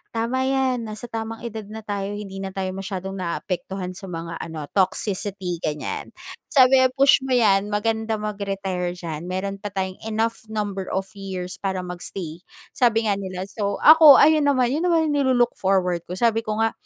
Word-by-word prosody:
tama 250 +3 0
yan 260 -3 0
nasa 215 +2 -7
tamang 225 0 -5
edad 220 -3 -6
na 220 +1 -8
tayo 205 -1 -3
hindi 195 -2 -7
na 195 - -4
tayo 190 -1 -2
masyadong 190 0 -5
naaapektuhan 180 +1 -4
sa 190 +1 -9
mga 170 -1 -6
ano 160 -2 -6
toxicity 190 -2 -1
ganyan. 150 -2 -4 0.3
Sabi, 265 -2 +6 0.2
"Push 275 0 +6
mo 260 - +2
'yan 205 -4 +3
maganda 220 +1 -1
mag-retire 195 -4 -3
diyan. 170 -1 -6
Meron 195 +2 -3
pa 205 - -5
tayong 190 -1 -3
enough 220 0 -2
number 205 -3 -3
of 190 0 -1
years 185 -2 -6
para 190 -2 -2
mag-stay", 175 -2 -6 0.3
sabi 230 -2 +2
nga 200 - -1
nila. 185 -1 -5
So 200 -2 -2
ako, 310 -2 +10
ayun 305 0 +5
naman 255 -3 +3
yun 320 +6 0
naman 325 -3 +2
nilo-look-forward 195 - +1
ko. 180 - -5
Sabi 225 +2 +2
ko 215 0 -1
nga 225 - +2
200 Hz, 165 wpm, -23 LUFS, 185-230 Hz, 0.3 s, ako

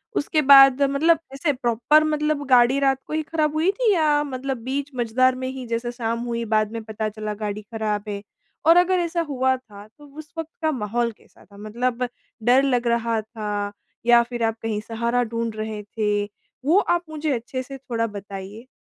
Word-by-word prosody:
उसके 305 +1 +1
बाद 275 -1 +8
मतलब 295 +4 +3
ऐसे 290 +1 0
प्रॉपर 250 +5 +3
मतलब 300 -1 0
गाड़ी 250 +1 +5
रात 270 -1 +2
को - - -6
ही 315 - +1
खराब 310 -1 -1
हुई 325 +5 +2
थी 450 +1 +1
या 300 -3 +3
मतलब 265 -1 -4
बीच 275 +2 -3
मझदार 250 +2 +2
में 260 0 -4
ही 260 -1 -6
जैसे 235 +1 -2
शाम 230 -1 -3
हुई 235 -1 -2
बाद 215 0 +2
में 230 -1 -5
पता 215 0 -3
चला 215 0 -5
गाड़ी 210 0 -4
खराब 210 -1 -3
है? 200 -1 -4 0.4
और 335 +2 +7
अगर 360 +1 +4
ऐसा 340 0 -1
हुआ 260 -1 +1
था 210 -4 -14
तो 295 +7 -18
उस 310 +2 -11
वक़्त 325 -1 -4
का 315 0 +2
माहौल 235 -1 -1
कैसा - - -22
था, 200 -1 -18
मतलब 240 +4 -2 0.4
डर 255 +3 +5
लग 250 -3 +1
रहा 230 -1 +1
था 210 -2 -4 0.3
या 240 0 +7
फिर 240 -1 -5
आप 225 0 0
कहीं 220 -2 -2
सहारा 235 +2 -1
ढूँढ 230 -1 -3
रहे 215 -1 -4
थे, 205 -1 -1 0.4
वो 335 +6 +4
आप 345 -3 +1
मुझे 310 -1 -2
अच्छे 245 +2 -4
से 275 +1 -9
थोड़ा 230 -3 -2
बताइए। 200 +2 -8
245 Hz, 195 wpm, -23 LUFS, 220-285 Hz, 0.4 s, बाद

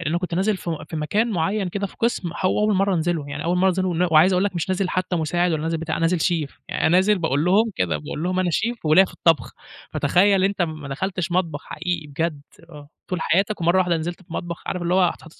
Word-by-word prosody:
لإن 165 0 -1
كنت 180 -2 -4
نازل 195 +3 +1
في 165 -4 -5
في 160 - -4
مكان 210 +10 0
معيّن 195 +1 -1
كده 200 +2 -3
في - - -16
قِسْم 230 -7 -1
هو 185 - +2
أول 210 -1 +2
مرّة 195 0 +2
أنزله 170 -1 0
ون 145 - -9
يعني 145 +1 -5
أول 175 +2 +1
مرّة 190 +1 +4
أنزله 185 0 0
ون 175 +1 +1
وعايز 160 +4 +6
أقول 185 +2 +2
لك 200 -2 -2
مش 170 +1 -2
نازل 185 0 0
حتّى 185 -1 -1
مساعد 175 +2 0
ولا 155 -1 -1
نازل 165 0 -1
بتاع، 160 -1 -3
أنا - - -4
نازل 170 +1 +2
Chef. 160 -5 0 0.2
يعني - - -3
أنا - - +5
نازل 190 +4 +4
باقول 155 -3 0
لهم 210 +5 +3
كده، 85 -4 0
باقول 115 - -6
لهم: 185 +1 -1
"أنا 180 - 0
Chef 235 +7 -1
وليّا 155 +5 +6
في - - -10
الطبخ." 165 -3 +1 0.4
فتخيّل 195 +1 +3
أنت 195 -2 +1
ما 155 -4 -4
دخلتش 180 +4 -3
مطبخ 165 -5 -1
حقيقي 180 -3 -4
بجد، 150 +1 -3 0.3
آه، 145 -2 -12 0.2
طول 180 -3 -2
حياتك 195 +4 +1
ومرّة 170 +3 +3
واحدة 180 -2 +2
نزلت 170 +3 -5
في 170 - -15
مطبخ، 170 -2 -5
عارف 180 -2 -3
اللي 175 +1 0
هو 190 - +4
هتحُط 165 -2 -2
175 Hz, 255 wpm, -22 LUFS, 160-190 Hz, 0.4 s, وعايز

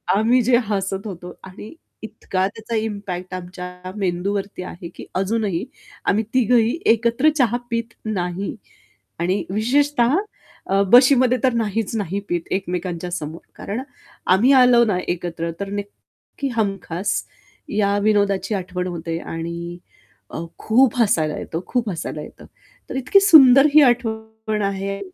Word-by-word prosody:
आम्ही 235 +4 +3
जे 240 0 +4
हसत 195 0 -2
होतो 180 -2 -8
आणि 195 - -10 0.3
इतका 190 -3 -2
त्याचा 220 +3 -6
इम्पॅक्ट 195 -4 -5
आमच्या 180 0 -8
मेंदूवरती 195 +1 -2
आहे 175 -1 -8
की - - -9
अजूनही 195 -2 -1 0.5
आम्ही 215 +3 +1
तिघंही 245 +4 +3
एकत्र 235 +6 +3
चहा 240 -2 +2
पीत 230 0 -2
नाही. 190 -2 -3 0.6
आणि 180 +4 0
विशेषतः 255 - +2 0.5
अ, 195 +1 +3
बशीमध्ये 255 0 +6
तर 255 -2 +3
नाहीच 225 -1 -1
नाही 200 -2 -2
पीत 175 -1 0
एकमेकांच्या 180 -2 -3
समोर, 165 -2 -5 0.2
कारण 215 +6 -5 0.5
आम्ही 235 +9 +4
आलो 250 -2 +6
ना 205 -4 0
एकत्र 170 -1 -3
तर 200 - -4
नक्की 205 +7 -7
हमखास 195 -3 -2 0.7
या 200 -1 +2
विनोदाची 205 -1 +1
आठवण 180 -1 -3
होते 165 -1 -4
आणि 170 +1 -6 0.5
अ, - - -7 0.2
खूप 250 +2 +3
हसायला 155 -8 +1
येतं, 165 - -4
खूप 240 -4 -1
हसायला 160 -4 -5
येतं. - - -12 0.4
तर - - -5
इतकी 265 +10 +4
सुंदर 275 -7 +8
ही 305 - +8
आठवण 220 -3 0
आहे 195 0 -2
200 Hz, 130 wpm, -21 LUFS, 180-235 Hz, 0.7 s, सुंदर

